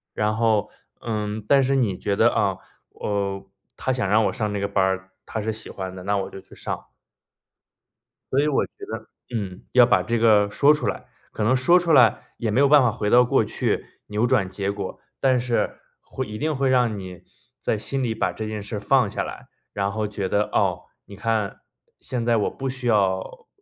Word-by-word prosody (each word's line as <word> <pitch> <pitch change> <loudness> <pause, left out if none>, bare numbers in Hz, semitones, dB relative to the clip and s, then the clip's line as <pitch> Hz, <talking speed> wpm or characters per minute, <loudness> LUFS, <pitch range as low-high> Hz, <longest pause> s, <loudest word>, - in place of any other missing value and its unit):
然 105 0 +1
后， 110 -2 +2 0.3
嗯， 105 -1 -3
但 140 +5 +5
是 135 +1 +2
你 110 -9 +1
觉 100 +1 -1
得： 115 +3 +5
“啊， 95 -2 +1 0.3
呃， 100 -1 -3 0.3
她 130 - -1
想 130 -5 0
让 110 +2 +4
我 - - 0
上 105 -2 -2
这 100 - -2
个 100 - 0
班 100 -1 +1
儿， 95 0 -1
她 110 - -4
是 110 +1 -1
喜 110 0 -8
欢 95 -1 -6
的， 95 -1 -9
那 100 +2 0
我 95 - -4
就 - - -9
去 - - -16
上。” - - -4 1.5
所 130 - +3
以 145 - +3
我 145 - +2
觉 - - -21 0.2
得， - - -6 0.3
嗯， 95 -4 -4
要 125 -1 +8
把 - - +3
这 120 0 -1
个 105 -3 +4
说 140 +9 +5
出 150 - -2
来。 - - -4 0.2
可 110 - -3
能 115 +5 +3
说 130 +8 +5
出 170 -1 0
来， 125 -7 +4
也 115 - -2
没 105 - +1
有 140 - +6
办 145 0 +7
法 125 -3 +3
回 105 -2 -2
到 125 +2 +7
过 - - +3
去， - - -1 0.2
扭 105 +3 0
转 100 -5 +2
结 100 +1 -2
果。 100 -2 -6 0.2
但 130 -2 +3
是， 120 -1 -1 0.2
会 130 - -5
一 105 -1 -7
定 155 +5 -1
会 135 0 +1
让 125 -4 +2
你 95 -2 -9 0.4
在 - - -1
心 135 +6 -3
里 115 -2 -1
把 - - 0
这 110 - -5
件 110 -1 -4
事 100 +2 -6
儿 - - -3
放 110 +2 +3
下 - - -3
来， - - -8 0.3
然 100 0 -1
后 110 +1 -2
觉 100 -2 -3
得， 105 - +2
哦， - - +1 0.2
你 100 - -11
看， 110 0 -1 0.4
现 120 -3 -4
在 120 -1 +3
我 105 - +1
不 135 0 -4
需 130 -1 -5
要 95 -4 0
110 Hz, 235 characters per minute, -23 LUFS, 100-125 Hz, 1.5 s, 要